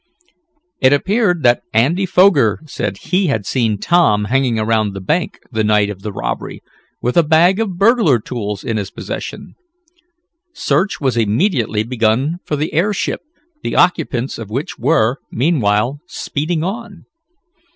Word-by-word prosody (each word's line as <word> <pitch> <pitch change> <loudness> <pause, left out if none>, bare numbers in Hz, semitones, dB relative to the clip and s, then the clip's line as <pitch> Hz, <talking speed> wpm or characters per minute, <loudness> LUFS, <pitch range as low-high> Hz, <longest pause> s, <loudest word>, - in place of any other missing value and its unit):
It 130 0 +5
appeared 180 +1 +1
that 120 0 +4
Andy 160 - +2
Foger 175 - +4
said 100 -9 -4
he 185 - 0
had 110 -9 -1
seen 115 -5 0
Tom 105 - +2
hanging 130 0 +1
around 110 -2 0
the - - -4
bank 155 - -1
the 110 -2 0
night 105 -1 +2
of 95 -2 -9
the 105 - -5
robbery, - - -5 0.4
with 125 +5 0
a - - +8
bag 165 +5 +4
of 200 -6 -2
burglar 200 - +4
tools 105 -3 -5
in 115 - -2
his 100 -2 -3
possession. - - -7 1.0
Search 200 +2 0
was 130 -4 0
immediately 115 - +1
begun 125 +7 0
for 150 - -2
the 150 +2 -3
airship, 195 +6 0 0.4
the - - -3
occupants 140 -9 +1
of 110 -3 -7
which 135 +8 -4
were, 135 -5 +2
meanwhile, 125 -2 +1
speeding 155 0 -3
on. 200 -1 -6
135 Hz, 145 wpm, -17 LUFS, 110-175 Hz, 1.0 s, a